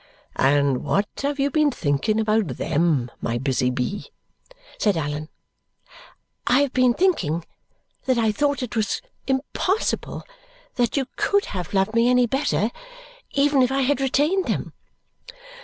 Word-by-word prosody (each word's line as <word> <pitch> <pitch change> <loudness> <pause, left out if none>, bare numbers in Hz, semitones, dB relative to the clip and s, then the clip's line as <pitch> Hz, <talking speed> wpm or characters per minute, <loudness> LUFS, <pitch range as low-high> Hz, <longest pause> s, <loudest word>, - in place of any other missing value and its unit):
"And 140 -1 +2
what 200 +1 +1
have 285 0 -2
you 280 +1 +1
been 305 0 +3
thinking 170 - 0
about 215 -2 +2
THEM, 145 -6 +1
my 115 +1 -1
busy 130 0 0
bee?" 125 +10 -3 0.7
said 205 -5 +2
Allan. 150 0 -3 1.2
"I 255 +3 +5
have 280 -2 0
been 255 -2 +3
thinking 175 - +1 0.6
that 255 -2 +2
I 225 -2 +2
thought 285 +4 0
it 240 - -5
was 220 - -1 0.2
impossible 285 +9 -1 0.5
that 240 +2 0
you 270 - +1
COULD 405 0 +2
have 180 0 -4
loved 195 +3 +2
me 230 +1 +4
any 250 0 +4
better, 255 -3 0 0.6
even 280 -1 +3
if 255 0 +3
I 270 0 +1
had 275 +1 +1
retained 300 +8 +2
them." - - -2
235 Hz, 140 wpm, -23 LUFS, -, 1.2 s, I